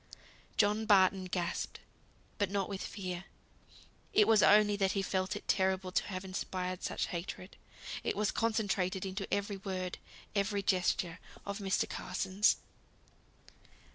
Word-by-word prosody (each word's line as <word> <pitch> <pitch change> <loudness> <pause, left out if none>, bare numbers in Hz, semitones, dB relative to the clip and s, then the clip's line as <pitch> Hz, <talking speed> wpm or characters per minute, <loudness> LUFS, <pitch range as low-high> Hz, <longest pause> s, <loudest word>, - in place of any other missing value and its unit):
John 210 +1 +3
Barton 190 -2 +5
gasped, 175 -1 -2 0.6
but 205 -2 +2
not 195 -1 0
with 195 -1 -5
fear. 185 -2 -5 0.9
It 210 - +6
was 220 -2 +6
only 210 0 +6
that 195 -1 +2
he 195 - 0
felt 190 +1 -1
it 205 - -7
terrible 190 -1 +1
to - - +2
have 185 -1 -5
inspired 185 -1 -3
such - - -1
hatred, 180 +2 -5 0.5
as - - 0
was 210 0 +1
concentrated 200 -4 0
into 195 +1 -4
every 200 0 -1
word, 185 -2 -4 0.3
every 200 0 0
gesture 180 -2 +1 0.3
of 200 +1 -4
Mr. 195 -2 +1
Carson's. 195 +2 +1
195 Hz, 135 wpm, -33 LUFS, 185-205 Hz, 0.9 s, It